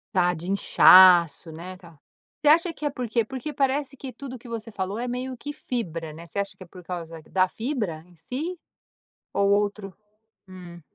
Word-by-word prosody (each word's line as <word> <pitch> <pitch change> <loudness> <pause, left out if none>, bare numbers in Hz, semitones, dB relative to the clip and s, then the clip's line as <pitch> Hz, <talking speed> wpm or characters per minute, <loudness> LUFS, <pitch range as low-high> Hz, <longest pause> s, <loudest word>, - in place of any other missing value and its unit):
Tá 180 -1 +3
de 175 +3 -5
inchaço, 180 -4 +6
né, 180 +3 -9
tá 170 -4 -17 0.5
Você - - +2
acha 335 +2 +4
que 305 - -7
é - - +2
por 255 -3 -5
quê? 230 +1 +1
Porque 265 +6 -6
parece 275 0 0
que 265 0 -8
tudo 260 -1 -8
que 240 0 -14
você 225 -1 -5
falou 200 +1 -4
é 245 - -3
meio 250 +1 -4
que 290 +5 -6
fibra, 170 - -4
né, 165 +2 -11
você 200 - -4
acha 200 0 -3
que 185 - -10
é - - -14
por 180 0 -13
causa 165 -2 -7
da 185 -1 +3
fibra 215 - -4
em 180 - -22
si? 310 - -5 0.7
Ou 200 0 +2
outro 205 -1 0 0.6
Hum. 175 -2 -11
200 Hz, 195 wpm, -25 LUFS, 180-255 Hz, 0.7 s, inchaço